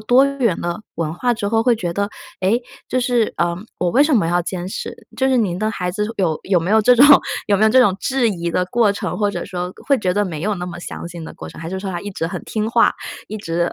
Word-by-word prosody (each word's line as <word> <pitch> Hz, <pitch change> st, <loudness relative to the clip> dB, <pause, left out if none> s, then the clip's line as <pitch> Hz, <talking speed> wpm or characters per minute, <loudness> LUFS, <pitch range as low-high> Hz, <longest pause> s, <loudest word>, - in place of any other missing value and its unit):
多 245 Hz, +5 st, +5 dB
元 260 Hz, -10 st, 0 dB
的 175 Hz, +5 st, -3 dB
文 160 Hz, -2 st, -2 dB
化 245 Hz, +8 st, 0 dB
之 205 Hz, -2 st, -3 dB
后， 225 Hz, +1 st, +2 dB
会 245 Hz, -1 st, +4 dB
觉 175 Hz, -5 st, -3 dB
得： 200 Hz, +2 st, -1 dB, 0.3 s
“诶， 210 Hz, +6 st, +2 dB, 0.3 s
就 255 Hz, -, 0 dB
是， 245 Hz, -3 st, +1 dB
呃， 170 Hz, 0 st, +1 dB, 0.2 s
我 180 Hz, 0 st, +1 dB
为 270 Hz, -, +5 dB
什 295 Hz, 0 st, +3 dB
么 205 Hz, -8 st, +3 dB
要 175 Hz, +1 st, +2 dB
坚 180 Hz, 0 st, -4 dB
持？” -, -, -5 dB, 0.2 s
就 265 Hz, -, +2 dB
是 260 Hz, -, +3 dB
您 185 Hz, -6 st, 0 dB
的 215 Hz, +1 st, 0 dB
孩 180 Hz, -4 st, -3 dB
子， 210 Hz, +3 st, -2 dB
有 170 Hz, -6 st, 0 dB
有 185 Hz, -3 st, +2 dB
没 175 Hz, +4 st, -2 dB
有 220 Hz, 0 st, +5 dB
这 250 Hz, +3 st, +6 dB
种 270 Hz, +4 st, +7 dB, 0.4 s
有 200 Hz, -1 st, +3 dB
没 215 Hz, -, +3 dB
有 220 Hz, -, +6 dB
这 260 Hz, +2 st, +6 dB
种 195 Hz, -6 st, +3 dB
质 265 Hz, -3 st, +1 dB
疑 170 Hz, -4 st, -2 dB
的 180 Hz, +2 st, +1 dB
过 220 Hz, 0 st, +2 dB
程？ 200 Hz, -, -4 dB
或 205 Hz, -1 st, +1 dB
者 -, -, -4 dB
说， 180 Hz, -1 st, -4 dB
会 280 Hz, -2 st, +4 dB
觉 185 Hz, -3 st, 0 dB
得 205 Hz, +1 st, +1 dB
没 160 Hz, -5 st, -5 dB
有 210 Hz, +1 st, 0 dB
那 180 Hz, -2 st, -5 dB
么 175 Hz, -, -7 dB
相 170 Hz, -, -7 dB
信 170 Hz, -2 st, -8 dB
的 -, -, -8 dB
过 80 Hz, -, -9 dB
程？ -, -, -12 dB
还 165 Hz, -, -5 dB
是 190 Hz, 0 st, -4 dB
说 195 Hz, -, -4 dB
他 175 Hz, -2 st, -4 dB
一 205 Hz, -, -6 dB
直 165 Hz, -3 st, -3 dB
很 170 Hz, -, -5 dB
听 215 Hz, 0 st, -2 dB
话， -, -, +4 dB, 0.4 s
一 215 Hz, -, -5 dB
直 170 Hz, -3 st, -1 dB
200 Hz, 300 characters per minute, -20 LUFS, 175-230 Hz, 0.4 s, 种